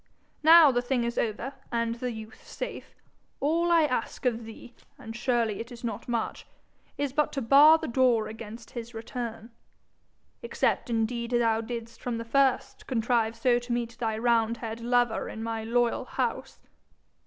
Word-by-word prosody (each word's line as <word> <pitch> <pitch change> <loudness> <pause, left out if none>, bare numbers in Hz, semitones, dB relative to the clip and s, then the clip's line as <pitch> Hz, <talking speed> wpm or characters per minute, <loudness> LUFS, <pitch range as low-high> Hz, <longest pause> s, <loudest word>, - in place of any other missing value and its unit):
'Now 320 -1 +8
the 245 -1 +1
thing 245 0 0
is 235 +1 -2
over, 235 +5 -2 0.2
and 230 -1 0
the 245 +2 -4
youth 220 -1 -10
safe, - - -7 0.4
all 335 +4 +1
I 335 -2 +5
ask 255 -3 -2
of 235 -2 0
thee, 225 +2 -11 0.2
and 225 0 -9
surely 235 -3 0
it 235 +2 -7
is 240 0 -11
not 225 -4 -4
much, 235 -2 -3 0.5
is 285 -2 -2
but 300 +1 +1
to 275 - -1
bar 290 +6 +7
the - - -5
door 240 -3 +2
against 225 +1 -9
his 235 -1 -7
return 225 0 -6 0.9
except 470 - -1
indeed 235 +1 -1
thou 230 -2 +2
didst 230 0 -7
from 240 -2 -3
the 230 - -5
first 265 +1 +1
contrive 230 -2 +1
so 240 +1 +2
to 245 0 -8
meet 235 -1 -2
thy 220 -2 -1
roundhead 230 0 0
lover 240 -1 +1
in 220 - -6
my 225 -1 -3
loyal 235 +1 0
house. - - -3
235 Hz, 165 wpm, -27 LUFS, 225-250 Hz, 0.9 s, Now